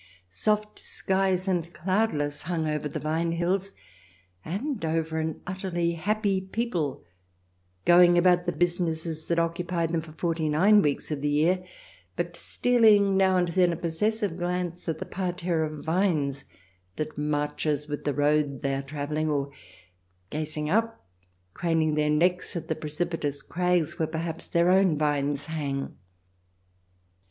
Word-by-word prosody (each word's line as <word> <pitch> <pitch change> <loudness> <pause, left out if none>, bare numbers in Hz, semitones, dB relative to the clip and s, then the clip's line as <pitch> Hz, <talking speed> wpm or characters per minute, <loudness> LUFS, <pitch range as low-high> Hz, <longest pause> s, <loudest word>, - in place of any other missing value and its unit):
Soft 210 - 0
skies 190 -1 0
and 175 -3 0
cloudless 170 -6 0
hung 165 -1 -2
over 150 -1 -2
the - - -4
vine 165 +2 -1
hills, 185 +3 0 0.7
and 220 - -3
over 160 0 -1
an 160 0 -3
utterly 180 -2 -1
happy 195 +3 0
people 190 - -2 0.8
going 175 0 +7
about 180 0 +4
the - - +2
businesses 165 -1 -1
that 170 - 0
occupy 170 +1 0
them 165 0 -1
for 155 -1 -12
forty 160 -1 -1
nine 200 +8 +5
weeks 145 -1 -1
of 145 -2 -2
the 145 - 0
year, 165 +5 +2 0.5
but - - -3
stealing 215 -5 +3
now 190 -1 +4
and 175 -1 +1
then 180 0 +3
a - - -2
posses 175 +7 0
sive 190 -5 -1
glance 175 -1 -2
at 160 - -1
the - - -5
parterre 175 -3 -1
of 155 -1 -5
vines 160 -6 0 0.5
that 155 +5 -4
marches 150 0 -1
with 145 -1 -4
the 145 - 0
road 145 -1 +1
they 135 0 0
are 135 - -1
travelling, 150 +2 -3
or 140 -1 -1 0.8
gazing 150 0 -2
up, 225 +6 0 0.5
craning 165 -2 +1
their 150 0 +1
necks 175 +5 +2
at 165 -1 -5
the 160 - 0
precipitous 150 -2 -3
crags 180 -2 0
where 160 - +1
perhaps 165 +1 -4
their 170 +1 +3
own 185 -4 +4
vines 145 -1 0
hang. 145 -4 -3
165 Hz, 145 wpm, -27 LUFS, 150-180 Hz, 0.8 s, going